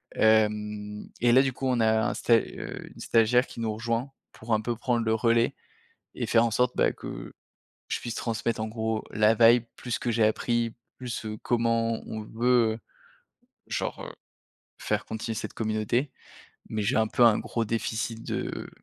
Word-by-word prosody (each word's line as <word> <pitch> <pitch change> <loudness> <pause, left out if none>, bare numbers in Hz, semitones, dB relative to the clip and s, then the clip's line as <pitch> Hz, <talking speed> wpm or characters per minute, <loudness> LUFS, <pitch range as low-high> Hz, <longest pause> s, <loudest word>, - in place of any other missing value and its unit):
Hem, 105 -1 +1
et 120 -1 +4
là 130 +2 +7
du 135 -2 0
coup 135 +1 -3
on 125 -2 +1
a 110 0 +3
un - - -2
sta 115 - +3
heu, - - -6
une - - -15
stagiaire 120 +2 +3
qui - - -10
nous 110 -2 -1
rejoint 115 +4 -2 0.2
pour 110 0 -4
un 110 - +2
peu 120 +1 -2
prendre 120 0 0
le 110 - +2
relais, 115 +1 +2 0.6
et - - -2
faire 115 0 +4
en 115 - 0
sorte, 125 +2 +2
bah, - - +3
que - - -8 0.6
je - - -1
puisse 120 - -5
transmettre 115 -1 -2
en 110 - -2
gros 110 0 -2
la 110 +1 +4
vibe, 115 +1 +6
plus 120 -2 -3
que 120 - -1
j'ai 115 -1 +2
appris, 115 +1 0 0.2
plus, 125 -3 -5
heu, 105 0 -4
comment 115 -1 +1
on 110 - -5
veut, 115 0 +2
heu, - - -11 0.9
genre, - - -3
heu, - - -7 0.7
faire - - -1
continuer 110 +1 -4
cette 110 - -5
communauté. 110 +5 -1 0.6
Mais 110 - -3
j'ai 115 +6 +1
un 110 -1 +3
peu 120 - +3
un 115 -2 +6
gros 115 - -2
déficit 115 0 -2
de - - -4
115 Hz, 185 wpm, -27 LUFS, 110-120 Hz, 0.9 s, là